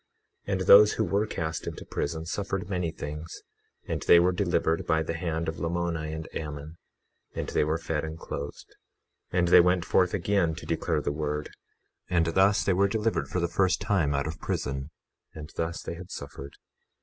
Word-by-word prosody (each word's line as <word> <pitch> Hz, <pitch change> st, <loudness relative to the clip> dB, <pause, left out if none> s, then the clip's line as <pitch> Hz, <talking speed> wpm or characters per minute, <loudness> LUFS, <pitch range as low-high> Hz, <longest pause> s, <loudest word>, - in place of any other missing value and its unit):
21:14 -, -, -2 dB
And 95 Hz, -, 0 dB
those 100 Hz, +3 st, +8 dB
who 110 Hz, -, 0 dB
were 100 Hz, +2 st, +1 dB
cast 80 Hz, -4 st, -4 dB
into -, -, -6 dB
prison 80 Hz, +2 st, -3 dB
suffered 95 Hz, +1 st, -3 dB
many 90 Hz, -3 st, -1 dB
things, 75 Hz, +1 st, -7 dB, 0.4 s
and -, -, -2 dB
they 85 Hz, -, +7 dB
were 90 Hz, +1 st, +4 dB
delivered 80 Hz, -2 st, 0 dB
by 80 Hz, -1 st, +2 dB
the 80 Hz, -, -3 dB
hand 80 Hz, -1 st, -2 dB
of 80 Hz, -, -3 dB
Lamoni 85 Hz, -2 st, -2 dB
and 80 Hz, 0 st, -5 dB
Ammon, 75 Hz, +1 st, -6 dB, 0.6 s
and -, -, -3 dB
they -, -, +2 dB
were 75 Hz, +2 st, 0 dB
fed 80 Hz, -2 st, -2 dB
and 80 Hz, 0 st, -5 dB
clothed. 70 Hz, -2 st, -7 dB, 0.6 s
21:15 -, -, -2 dB
And 85 Hz, -, +3 dB
they 90 Hz, -, +9 dB
went 90 Hz, 0 st, +2 dB
forth 90 Hz, -1 st, +2 dB
again 90 Hz, -3 st, +1 dB
to 85 Hz, -, -9 dB
declare 80 Hz, -1 st, 0 dB
the 70 Hz, -, -1 dB
word, 75 Hz, 0 st, -3 dB, 0.6 s
and 85 Hz, -2 st, +3 dB
thus 95 Hz, +5 st, +3 dB
they 95 Hz, -, +2 dB
were 100 Hz, +2 st, +3 dB
delivered 110 Hz, +2 st, 0 dB
for 90 Hz, -, -2 dB
the 85 Hz, -, +1 dB
first 95 Hz, +2 st, +2 dB
time 95 Hz, -9 st, +1 dB
out 70 Hz, -, 0 dB
of 80 Hz, +1 st, -5 dB
prison; 70 Hz, +1 st, -3 dB, 0.5 s
and 75 Hz, 0 st, -8 dB
thus 85 Hz, 0 st, -3 dB
they -, -, -4 dB
had 90 Hz, +2 st, -10 dB
suffered. 70 Hz, -3 st, -8 dB
85 Hz, 195 wpm, -28 LUFS, 80-90 Hz, 0.6 s, they